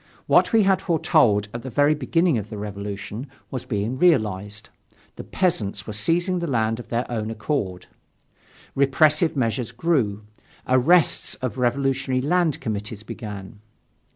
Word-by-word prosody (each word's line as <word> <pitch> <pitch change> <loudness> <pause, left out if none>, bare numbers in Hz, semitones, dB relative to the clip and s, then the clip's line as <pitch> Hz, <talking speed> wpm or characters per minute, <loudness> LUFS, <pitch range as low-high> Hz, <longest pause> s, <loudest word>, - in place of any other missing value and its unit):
What - - +4
we 225 -2 +5
had 190 -1 +3
foretold 115 - +2
at 120 - -5
the 130 - -6
very 145 +4 +3
beginning 155 0 +1
of 105 0 -8
the 105 - -7
Revolution, 105 +4 -6 0.2
was 130 -2 -5
being 110 +3 -2
realized: 105 - +1 0.5
the - - -8
peasants 105 - -1
were 110 - -6
seizing 175 - +1
the 170 - -3
land 115 -4 0
of 120 - -9
their 120 +1 -1
own 110 -2 -3
accord. 105 -5 -3 0.9
Repressive 155 +4 +3
measures 120 -2 -1
grew, 120 -7 0 0.4
arrests 145 +7 +3
of 130 0 -4
revolutionary 130 +1 0
land 165 +3 +1
committees 105 -2 -4
began. 105 -2 -8
120 Hz, 140 wpm, -23 LUFS, 105-150 Hz, 0.9 s, we